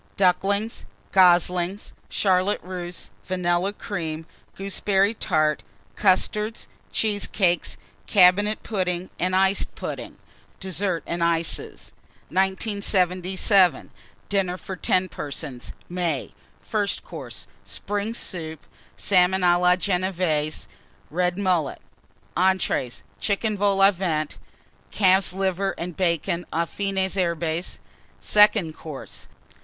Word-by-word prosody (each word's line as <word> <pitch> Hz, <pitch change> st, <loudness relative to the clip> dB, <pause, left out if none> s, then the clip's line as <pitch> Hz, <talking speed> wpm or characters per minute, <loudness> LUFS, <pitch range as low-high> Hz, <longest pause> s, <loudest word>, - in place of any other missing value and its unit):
Ducklings. 200 Hz, +4 st, +1 dB, 0.3 s
Goslings. 180 Hz, +1 st, +3 dB, 0.2 s
Charlotte 190 Hz, +1 st, +2 dB
Russe. 180 Hz, -1 st, -5 dB, 0.2 s
Vanilla 180 Hz, +1 st, +1 dB
Cream. 165 Hz, -7 st, -5 dB, 0.3 s
Gooseberry 195 Hz, +1 st, +1 dB
Tart. 155 Hz, -, +1 dB, 0.3 s
Custards. 210 Hz, +3 st, +1 dB, 0.2 s
Cheesecakes. 205 Hz, -4 st, 0 dB, 0.3 s
Cabinet 205 Hz, +3 st, +4 dB
Pudding 185 Hz, -4 st, -2 dB
and 185 Hz, +1 st, +1 dB
Iced 190 Hz, +1 st, +2 dB
Pudding. -, -, -6 dB, 0.4 s
DESSERT 190 Hz, -2 st, -1 dB
AND 170 Hz, 0 st, -2 dB
ICES. 165 Hz, -1 st, -1 dB, 0.4 s
1977. 190 Hz, -, +2 dB, 0.4 s
DINNER 190 Hz, -3 st, 0 dB
FOR 190 Hz, -, -7 dB
10 185 Hz, +1 st, +1 dB
PERSONS 145 Hz, -5 st, -6 dB, 0.2 s
(May). 175 Hz, -6 st, -2 dB, 0.3 s
FIRST 205 Hz, -2 st, -1 dB
COURSE. -, -, -9 dB, 0.2 s
Spring 205 Hz, +2 st, -3 dB
Soup. 160 Hz, -8 st, -5 dB, 0.4 s
Salmon 185 Hz, -1 st, +3 dB
à 175 Hz, -1 st, +4 dB
la 180 Hz, 0 st, +5 dB
Genévése. 180 Hz, -5 st, -1 dB, 0.5 s
Red 180 Hz, +2 st, 0 dB
Mullet. 180 Hz, -7 st, 0 dB, 0.6 s
ENTREES. 185 Hz, -9 st, +1 dB, 0.2 s
Chicken 215 Hz, +1 st, 0 dB
Vol 200 Hz, -1 st, +1 dB
au 195 Hz, -, +8 dB
Vent. 165 Hz, -5 st, -2 dB, 0.5 s
Calf's 190 Hz, -2 st, +3 dB
Liver 195 Hz, +1 st, -1 dB
and 175 Hz, 0 st, -5 dB
Bacon 175 Hz, 0 st, 0 dB
aux 170 Hz, +1 st, +1 dB
Fines 190 Hz, +1 st, -2 dB
Herbes. 170 Hz, -2 st, -1 dB, 0.4 s
SECOND 210 Hz, -6 st, +4 dB
COURSE. 150 Hz, -4 st, -8 dB
185 Hz, 95 wpm, -24 LUFS, 175-195 Hz, 0.6 s, au